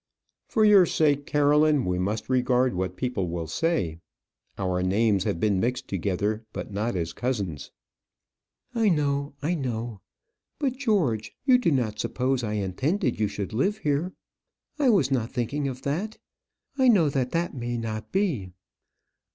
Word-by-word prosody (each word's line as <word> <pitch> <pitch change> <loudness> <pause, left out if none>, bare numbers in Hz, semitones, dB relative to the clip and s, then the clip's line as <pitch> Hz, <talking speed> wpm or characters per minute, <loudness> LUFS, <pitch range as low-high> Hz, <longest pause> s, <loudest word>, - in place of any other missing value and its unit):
"For 220 -4 +3
your 200 -4 +7
sake, 145 -3 +1
Caroline, 150 -1 +3
we 90 0 0
must 105 +4 -2
regard 125 0 +2
what 90 0 -2
people 115 -8 -2
will 85 -1 -3
say. 85 - -1 0.6
Our 90 -1 -1
names 100 +1 +2
have 85 - -1
been 100 -2 +2
mixed 125 +4 -1
together; 100 +3 -1
but - - -6
not 110 +2 -1
as 85 -1 -2
cousins." 100 - -3 1.0
"I 225 -3 +3
know, 140 -3 0
I 165 +4 +1
know. 120 - -3 0.6
But, 275 -4 -1
George, 170 - 0
you 255 -2 +6
do 235 - +2
not 115 -6 0
suppose 130 0 0
I 105 -2 -2
intended 125 - -1
you 105 - +2
should 100 +1 -5
live 195 - +1
here? 150 +4 -1 0.7
I 275 -3 +4
was 170 - +3
not 120 -4 0
thinking 140 +3 -2
of 130 0 -6
that. 185 +10 -2 0.6
I 260 - +5
know 195 -10 +5
that 130 -3 -1
that 170 +1 0
may 120 -2 -3
not 110 -1 -5
be." 165 - 0
125 Hz, 155 wpm, -26 LUFS, 105-155 Hz, 1.0 s, your